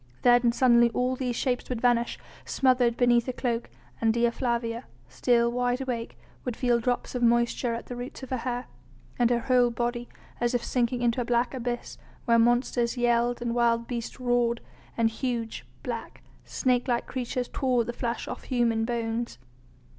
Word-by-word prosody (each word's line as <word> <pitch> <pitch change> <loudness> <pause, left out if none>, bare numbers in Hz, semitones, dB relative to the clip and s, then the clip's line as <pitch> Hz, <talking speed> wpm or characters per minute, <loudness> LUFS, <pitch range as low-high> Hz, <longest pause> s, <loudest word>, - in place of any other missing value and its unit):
Then 245 -1 +5
suddenly 240 -1 +5
all 250 +1 +1
these 250 -2 -2
shapes 250 0 -1
would 250 -3 -2
vanish, 240 -1 +2 0.3
smothered 250 -3 +2
beneath 240 -1 +3
a 255 - -1
cloak, 240 -2 -2 0.3
and 225 -1 +4
Dea 235 +1 +2
Flavia, 235 -1 -2 0.2
still 235 -1 +2
wide 245 +1 0
awake, 245 -3 -4 0.3
would 250 -3 -3
feel 240 -2 +2
drops 245 +1 -1
of 250 - -2
moisture 235 0 +2
at 230 - -6
the 245 - -6
roots 245 +2 -7
of 265 - -8
her 260 - +1
hair, 245 +1 -3 0.5
and 240 -1 +4
her 240 -1 +2
whole 245 0 +3
body, 240 +1 -3 0.3
as 240 +1 +1
if 240 - 0
sinking 245 0 0
into 240 +1 +2
a - - 0
black 240 +2 +1
abyss, 245 -2 -4 0.3
where 235 -1 +4
monsters 240 +1 +2
yelled 240 0 +1
and 235 -1 -1
wild 235 -1 +2
beasts 235 +1 -5
roared 245 -1 +1 0.4
and 225 -1 +3
huge, 230 -2 -3 0.2
black, - - -6 0.2
snake 250 -1 0
like 240 -2 0
creatures 250 -1 -3
tore 255 -3 +1
the 240 - -5
flesh 235 0 -3
off - - -7
human 230 -3 +1
bones. 235 - -2
240 Hz, 175 wpm, -27 LUFS, 235-250 Hz, 0.5 s, Then